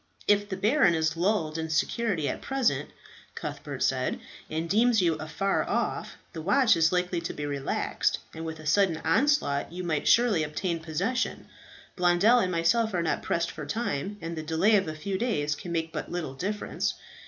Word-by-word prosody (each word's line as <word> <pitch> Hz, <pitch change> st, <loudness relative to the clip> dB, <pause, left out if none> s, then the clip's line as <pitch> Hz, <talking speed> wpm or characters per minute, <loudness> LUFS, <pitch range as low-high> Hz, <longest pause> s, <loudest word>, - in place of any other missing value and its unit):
"If 205 Hz, 0 st, +3 dB
the 190 Hz, -, -3 dB
baron 210 Hz, -, +3 dB
is 160 Hz, 0 st, 0 dB
lulled 165 Hz, -3 st, 0 dB
in 160 Hz, 0 st, -3 dB
security 175 Hz, 0 st, 0 dB
at -, -, -3 dB
present," 270 Hz, -3 st, 0 dB, 0.5 s
Cuthbert -, -, -5 dB
said, -, -, 0 dB, 0.3 s
"and 160 Hz, +2 st, -2 dB
deems 225 Hz, +5 st, +3 dB
you 170 Hz, -3 st, +3 dB
afar 160 Hz, +6 st, -1 dB
off, -, -, -2 dB, 0.2 s
the 165 Hz, -, -5 dB
watch 225 Hz, -, +4 dB
is 165 Hz, -1 st, +3 dB
likely 180 Hz, -1 st, 0 dB
to 170 Hz, -, -4 dB
be 145 Hz, -, -4 dB
relaxed, 140 Hz, -2 st, -1 dB, 0.2 s
and 160 Hz, -, -7 dB
with 160 Hz, -1 st, -5 dB
a 155 Hz, -, -11 dB
sudden 175 Hz, +1 st, +3 dB
onslaught 165 Hz, -, +2 dB
you 180 Hz, +1 st, -5 dB
might 155 Hz, -4 st, -1 dB
surely 235 Hz, -8 st, +4 dB
obtain 165 Hz, +3 st, -2 dB
possession. 185 Hz, +11 st, -2 dB, 0.5 s
Blondel 180 Hz, +7 st, +4 dB
and 185 Hz, -5 st, 0 dB
myself 185 Hz, +6 st, +2 dB
are 170 Hz, -, +1 dB
not 160 Hz, -, 0 dB
pressed 170 Hz, 0 st, -1 dB
for 155 Hz, -, -7 dB
time, 205 Hz, -4 st, -2 dB
and 165 Hz, +1 st, -4 dB
the 160 Hz, -, -4 dB
delay 165 Hz, +7 st, +3 dB
of 195 Hz, -4 st, +2 dB
a 155 Hz, -, -4 dB
few 190 Hz, +5 st, -3 dB
days 150 Hz, -12 st, 0 dB
can 170 Hz, +4 st, -7 dB
make 165 Hz, -1 st, -2 dB
but -, -, -4 dB
little 170 Hz, -6 st, -3 dB
difference. 200 Hz, +9 st, -2 dB
175 Hz, 185 wpm, -27 LUFS, 160-205 Hz, 0.5 s, watch